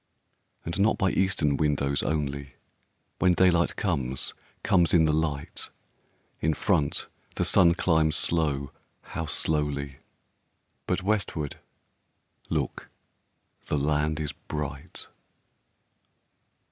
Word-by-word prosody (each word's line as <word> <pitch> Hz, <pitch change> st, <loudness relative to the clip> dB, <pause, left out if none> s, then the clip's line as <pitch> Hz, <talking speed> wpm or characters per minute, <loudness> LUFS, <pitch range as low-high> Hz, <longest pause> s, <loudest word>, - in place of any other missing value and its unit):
And 85 Hz, +4 st, -3 dB
not 105 Hz, +3 st, +3 dB
by 95 Hz, -1 st, +2 dB
eastern 80 Hz, -7 st, +1 dB
windows 70 Hz, -2 st, +1 dB
only, 70 Hz, -3 st, -2 dB, 0.6 s
When 90 Hz, -, +4 dB
daylight 85 Hz, -2 st, +3 dB
comes, 65 Hz, -9 st, -1 dB, 0.3 s
comes 90 Hz, -1 st, +3 dB
in 80 Hz, -2 st, +6 dB
the 75 Hz, -, +2 dB
light; 75 Hz, -2 st, -2 dB, 0.7 s
In 80 Hz, 0 st, +1 dB
front 70 Hz, 0 st, +1 dB, 0.3 s
the -, -, 0 dB
sun 85 Hz, -2 st, +5 dB
climbs 80 Hz, -3 st, +2 dB
slow, 75 Hz, -4 st, 0 dB, 0.3 s
how 80 Hz, -, -5 dB
slowly! 70 Hz, -2 st, -1 dB, 0.9 s
But 90 Hz, -, 0 dB
westward, 95 Hz, -8 st, -1 dB, 0.9 s
look, -, -, -2 dB, 0.8 s
the 75 Hz, -, 0 dB
land 75 Hz, +2 st, +1 dB
is 75 Hz, -2 st, -2 dB
bright! 70 Hz, -1 st, -6 dB
75 Hz, 100 wpm, -27 LUFS, 70-85 Hz, 0.9 s, in